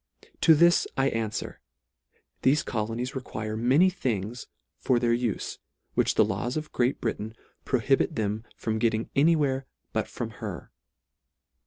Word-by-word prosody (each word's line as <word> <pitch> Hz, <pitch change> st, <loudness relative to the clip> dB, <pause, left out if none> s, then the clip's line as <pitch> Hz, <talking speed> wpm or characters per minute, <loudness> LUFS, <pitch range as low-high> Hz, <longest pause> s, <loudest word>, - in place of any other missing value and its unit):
To 160 Hz, -, +7 dB
this 170 Hz, +3 st, +5 dB
I 135 Hz, 0 st, +3 dB
anfwer. 110 Hz, -1 st, -3 dB, 0.8 s
Thefe 140 Hz, +3 st, +3 dB
colonies 115 Hz, +3 st, -2 dB
require 110 Hz, -5 st, -4 dB
many 135 Hz, +11 st, +4 dB
things 120 Hz, -, -3 dB, 0.3 s
for 125 Hz, -, +2 dB
their 120 Hz, -1 st, +2 dB
ufe, 120 Hz, -3 st, -2 dB, 0.3 s
which -, -, +2 dB
the -, -, +5 dB
laws 125 Hz, +5 st, -2 dB
of 155 Hz, 0 st, -5 dB
Great 125 Hz, +2 st, +1 dB
Britain 110 Hz, -1 st, -3 dB, 0.3 s
prohibit 135 Hz, +5 st, +2 dB
them 110 Hz, 0 st, -1 dB
from 110 Hz, 0 st, -2 dB
getting 110 Hz, 0 st, 0 dB
any 155 Hz, +4 st, +5 dB
where 135 Hz, -3 st, 0 dB, 0.3 s
but -, -, 0 dB
from -, -, -5 dB
her. -, -, -6 dB
120 Hz, 140 wpm, -27 LUFS, 110-135 Hz, 0.8 s, To